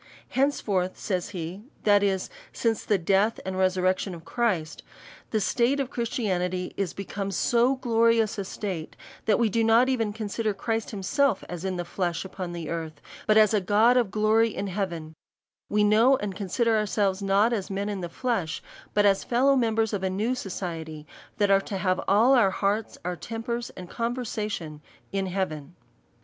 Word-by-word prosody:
Henceforth, 205 Hz, -10 st, 0 dB
says 185 Hz, -1 st, -2 dB
be; 180 Hz, +1 st, -5 dB, 0.2 s
that 205 Hz, -1 st, +5 dB
is, 195 Hz, -2 st, 0 dB, 0.2 s
since 225 Hz, -2 st, -1 dB
the 210 Hz, -, +2 dB
death 195 Hz, +5 st, +2 dB
and 190 Hz, 0 st, -3 dB
re 185 Hz, 0 st, +4 dB
surrection 185 Hz, 0 st, 0 dB
of 165 Hz, 0 st, -12 dB
Christ, 190 Hz, -8 st, -1 dB, 0.5 s
the 220 Hz, -, +1 dB
state 245 Hz, +6 st, +1 dB
of 275 Hz, -1 st, -2 dB
Christianity 185 Hz, -6 st, -2 dB
is 195 Hz, -4 st, -1 dB
be 195 Hz, -, -5 dB
come 200 Hz, +1 st, -4 dB
so 240 Hz, +7 st, +2 dB
glorious 230 Hz, -4 st, +2 dB
a -, -, -1 dB
state, 185 Hz, -4 st, -5 dB, 0.3 s
that 210 Hz, -, +3 dB
we 235 Hz, -, +3 dB
do 225 Hz, +2 st, +1 dB
not 230 Hz, +3 st, +5 dB
even 230 Hz, -5 st, 0 dB
consider 215 Hz, 0 st, -2 dB
Christ 225 Hz, +2 st, -2 dB
himself 220 Hz, +4 st, +1 dB
as 175 Hz, -1 st, -6 dB
in 190 Hz, -1 st, -2 dB
the 175 Hz, -1 st, -3 dB
flesh 175 Hz, -1 st, -2 dB
upon 185 Hz, -2 st, -6 dB
earth, 160 Hz, -2 st, -5 dB, 0.3 s
but 215 Hz, -, +5 dB
as 215 Hz, -1 st, +6 dB
a 210 Hz, -, +3 dB
God 215 Hz, +6 st, +4 dB
of 240 Hz, -5 st, +3 dB
glory 215 Hz, +3 st, +3 dB
in 200 Hz, -, -4 dB
heaven; 175 Hz, -5 st, -4 dB, 0.6 s
Ave 210 Hz, 0 st, +3 dB
know 225 Hz, +6 st, +5 dB
and 205 Hz, -4 st, -4 dB
consider 220 Hz, +4 st, +1 dB
ourselves 200 Hz, -2 st, 0 dB
not 200 Hz, +4 st, +3 dB
as 200 Hz, -5 st, -2 dB
men 200 Hz, +1 st, -2 dB
in 205 Hz, -2 st, -3 dB
the 175 Hz, -, -4 dB
flesh, 200 Hz, -7 st, -2 dB, 0.3 s
but 205 Hz, 0 st, +4 dB
as 195 Hz, -1 st, +3 dB
fellow 265 Hz, +3 st, +3 dB
members 225 Hz, -3 st, +1 dB
of 200 Hz, -, -1 dB
a 190 Hz, -, 0 dB
new 210 Hz, +6 st, 0 dB
society, 165 Hz, -9 st, -5 dB, 0.3 s
that 205 Hz, -1 st, +2 dB
are 195 Hz, 0 st, +5 dB
to 195 Hz, -, -5 dB
have 185 Hz, -1 st, 0 dB
all 220 Hz, +7 st, +5 dB
our 235 Hz, -7 st, +5 dB
hearts, 200 Hz, +3 st, -1 dB
our 180 Hz, 0 st, -1 dB
tem 225 Hz, +5 st, -6 dB
pers, 235 Hz, 0 st, -3 dB
and 180 Hz, -1 st, -7 dB
conversation 215 Hz, -9 st, -3 dB, 0.3 s
in 195 Hz, -1 st, -1 dB
heaven. 175 Hz, -4 st, -3 dB
205 Hz, 180 wpm, -26 LUFS, 185-225 Hz, 0.6 s, as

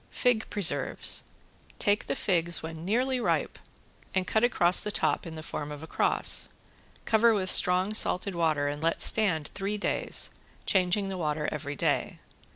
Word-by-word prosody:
~FIG 245 Hz, -3 st, 0 dB
PRESERVES~ 155 Hz, -9 st, +2 dB, 0.5 s
Take 205 Hz, +1 st, 0 dB
the -, -, -2 dB
figs 170 Hz, -3 st, 0 dB
when 160 Hz, 0 st, -7 dB
nearly 250 Hz, +7 st, 0 dB
ripe 240 Hz, -, -1 dB, 0.6 s
and 190 Hz, -1 st, +1 dB
cut 220 Hz, +4 st, 0 dB
across 180 Hz, -7 st, +3 dB
the -, -, -2 dB
top 205 Hz, -, -1 dB
in 160 Hz, -, -8 dB
the 155 Hz, -, -8 dB
form 150 Hz, -2 st, -6 dB
of 150 Hz, +1 st, -8 dB
a -, -, -6 dB
cross. -, -, +1 dB, 0.6 s
Cover 225 Hz, 0 st, +3 dB
with 185 Hz, -2 st, 0 dB
strong 185 Hz, +3 st, +3 dB
salted 200 Hz, -2 st, +2 dB
water 155 Hz, -4 st, 0 dB
and 145 Hz, +1 st, -4 dB
let 165 Hz, +1 st, 0 dB
stand 180 Hz, -9 st, +1 dB
three 200 Hz, +1 st, -3 dB
days, 205 Hz, -, +1 dB, 0.3 s
changing 190 Hz, +1 st, +1 dB
the 190 Hz, -1 st, -5 dB
water 150 Hz, -2 st, -2 dB
every 145 Hz, -1 st, -5 dB
day. -, -, -1 dB
180 Hz, 165 wpm, -27 LUFS, 160-210 Hz, 0.6 s, across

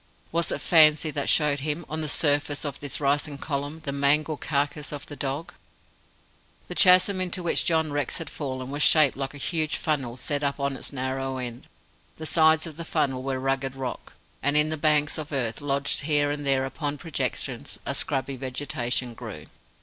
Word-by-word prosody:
Was 170 Hz, 0 st, 0 dB
it -, -, -3 dB
fancy 155 Hz, -2 st, +5 dB
that 145 Hz, -2 st, -2 dB
showed 150 Hz, -2 st, +3 dB
him, 150 Hz, +4 st, -3 dB
on 155 Hz, +1 st, -3 dB
the 155 Hz, -, -2 dB
surface 145 Hz, 0 st, +2 dB
of 145 Hz, -3 st, -5 dB
the 145 Hz, -2 st, -6 dB
rising 145 Hz, 0 st, 0 dB
column, 145 Hz, +2 st, -4 dB
the 145 Hz, -, -4 dB
mangled 145 Hz, +2 st, +1 dB
carcase 145 Hz, 0 st, -1 dB
of 145 Hz, -1 st, -6 dB
the 145 Hz, -, -8 dB
dog? 140 Hz, +5 st, -4 dB, 1.1 s
The -, -, -5 dB
chasm 185 Hz, +1 st, +6 dB
into 180 Hz, 0 st, -1 dB
which 170 Hz, -, +2 dB
John 160 Hz, -2 st, +1 dB
Rex 145 Hz, -3 st, -1 dB
had 165 Hz, -, -6 dB
fallen 130 Hz, -3 st, -5 dB
was 145 Hz, +1 st, -3 dB
shaped 155 Hz, -4 st, +6 dB
like 135 Hz, +1 st, -5 dB
a -, -, -7 dB
huge 155 Hz, +1 st, -1 dB
funnel 135 Hz, -7 st, -2 dB
set 145 Hz, +3 st, -1 dB
up 140 Hz, 0 st, -1 dB
on 140 Hz, -1 st, -1 dB
its -, -, -7 dB
narrow 135 Hz, 0 st, -3 dB
end. 120 Hz, -1 st, -6 dB, 0.5 s
The 160 Hz, -, -6 dB
sides 160 Hz, 0 st, +4 dB
of 160 Hz, -2 st, -8 dB
this 170 Hz, -1 st, -6 dB
funnel 135 Hz, -5 st, 0 dB
were 135 Hz, 0 st, -2 dB
rugged 135 Hz, 0 st, -1 dB
rock, 130 Hz, -2 st, -6 dB, 0.3 s
and 145 Hz, +1 st, +2 dB
in 150 Hz, +1 st, +3 dB
the 155 Hz, -, -1 dB
banks 150 Hz, 0 st, +2 dB
of 155 Hz, 0 st, -7 dB
earth 125 Hz, -4 st, -1 dB
lodged 140 Hz, 0 st, 0 dB
here 145 Hz, -1 st, +2 dB
and 145 Hz, -1 st, -4 dB
there 135 Hz, -1 st, +2 dB
upon 145 Hz, +2 st, -3 dB
projections, 160 Hz, 0 st, -3 dB
a -, -, -2 dB
scrubby 135 Hz, -1 st, -1 dB
vegetation 125 Hz, -2 st, -3 dB
grew. -, -, -9 dB
145 Hz, 190 wpm, -26 LUFS, 135-155 Hz, 1.1 s, chasm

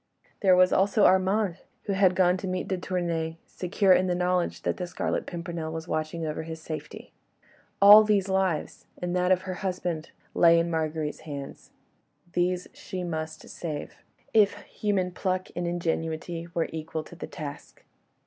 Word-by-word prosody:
There 190 Hz, -2 st, +6 dB
was 185 Hz, 0 st, +5 dB
also 200 Hz, +2 st, +3 dB
Armand, 190 Hz, 0 st, +3 dB, 0.3 s
who 200 Hz, -, -2 dB
had 190 Hz, -1 st, +4 dB
gone 180 Hz, -1 st, +4 dB
to 190 Hz, -, -5 dB
meet 185 Hz, 0 st, -2 dB
de 190 Hz, -, 0 dB
Tournay, 170 Hz, -3 st, -2 dB
secure 190 Hz, +1 st, +2 dB
in 185 Hz, +1 st, +3 dB
the 180 Hz, -, +1 dB
knowledge 180 Hz, 0 st, 0 dB
that -, -, -1 dB
the 180 Hz, -, -4 dB
Scarlet 175 Hz, -, -2 dB
Pimpernel 170 Hz, -2 st, -5 dB
was 160 Hz, +1 st, -6 dB
watching 155 Hz, +1 st, -2 dB
over 155 Hz, 0 st, -3 dB
his 160 Hz, 0 st, -7 dB
safety. 155 Hz, -1 st, -8 dB, 0.7 s
All 205 Hz, +2 st, +10 dB
these 205 Hz, -3 st, +2 dB
lives, 190 Hz, -4 st, -1 dB
and 175 Hz, 0 st, -3 dB
that 180 Hz, 0 st, +2 dB
of 185 Hz, 0 st, +3 dB
her 185 Hz, -1 st, -4 dB
husband, 175 Hz, -4 st, -3 dB, 0.2 s
lay 170 Hz, -1 st, +6 dB
in 170 Hz, +1 st, +1 dB
Marguerite's 155 Hz, -1 st, -2 dB
hands; 140 Hz, -3 st, -8 dB, 0.6 s
these 180 Hz, 0 st, 0 dB
she 185 Hz, -1 st, -6 dB
must 160 Hz, -2 st, -5 dB
save, 155 Hz, -4 st, -6 dB, 0.4 s
if 205 Hz, -2 st, +5 dB
human 195 Hz, -4 st, -1 dB
pluck 185 Hz, 0 st, -2 dB
and 175 Hz, 0 st, -2 dB
ingenuity 165 Hz, 0 st, -2 dB
were 165 Hz, -, +1 dB
equal 160 Hz, 0 st, -4 dB
to 175 Hz, -, -13 dB
the -, -, -7 dB
task. 145 Hz, -1 st, -9 dB
175 Hz, 165 wpm, -27 LUFS, 160-185 Hz, 0.7 s, All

